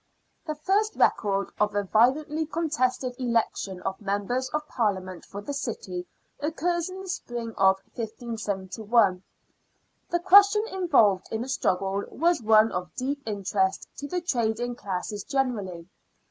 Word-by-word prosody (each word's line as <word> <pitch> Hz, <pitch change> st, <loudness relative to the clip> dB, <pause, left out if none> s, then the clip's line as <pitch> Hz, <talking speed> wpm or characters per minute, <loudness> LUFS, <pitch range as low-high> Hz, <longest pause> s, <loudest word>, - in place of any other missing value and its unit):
The 310 Hz, -, -2 dB
first 405 Hz, +8 st, +1 dB
record 200 Hz, -2 st, +2 dB
of 210 Hz, 0 st, +1 dB
a 205 Hz, -, +1 dB
violently 290 Hz, -, +2 dB
contested 260 Hz, -6 st, 0 dB
election 230 Hz, -6 st, -1 dB
of 190 Hz, -, -3 dB
Members 205 Hz, +6 st, -1 dB
of 300 Hz, 0 st, -3 dB
Parliament 190 Hz, -6 st, -2 dB
for 200 Hz, -, -8 dB
the 285 Hz, -, -4 dB
city 190 Hz, -9 st, -4 dB, 0.3 s
occurs 335 Hz, +3 st, -1 dB
in 375 Hz, +1 st, -7 dB
the 385 Hz, -, -9 dB
spring 240 Hz, -10 st, -4 dB
of 190 Hz, 0 st, +5 dB, 0.2 s
157 220 Hz, -4 st, -4 dB, 0.2 s
1. 200 Hz, -6 st, +4 dB, 0.9 s
The 345 Hz, -1 st, +1 dB
question 405 Hz, +4 st, +6 dB
involved 225 Hz, -, +3 dB
in 225 Hz, +1 st, -2 dB
the -, -, -7 dB
struggle 195 Hz, -5 st, 0 dB
was 335 Hz, 0 st, +1 dB
one 220 Hz, 0 st, +5 dB
of 180 Hz, -2 st, -4 dB
deep 280 Hz, +3 st, -2 dB
interest 195 Hz, -2 st, -1 dB
to 285 Hz, -, -5 dB
the 360 Hz, +3 st, -2 dB
trading 240 Hz, -6 st, 0 dB
classes 205 Hz, -2 st, -4 dB
generally. 210 Hz, -, -2 dB
235 Hz, 140 wpm, -26 LUFS, 200-300 Hz, 0.9 s, question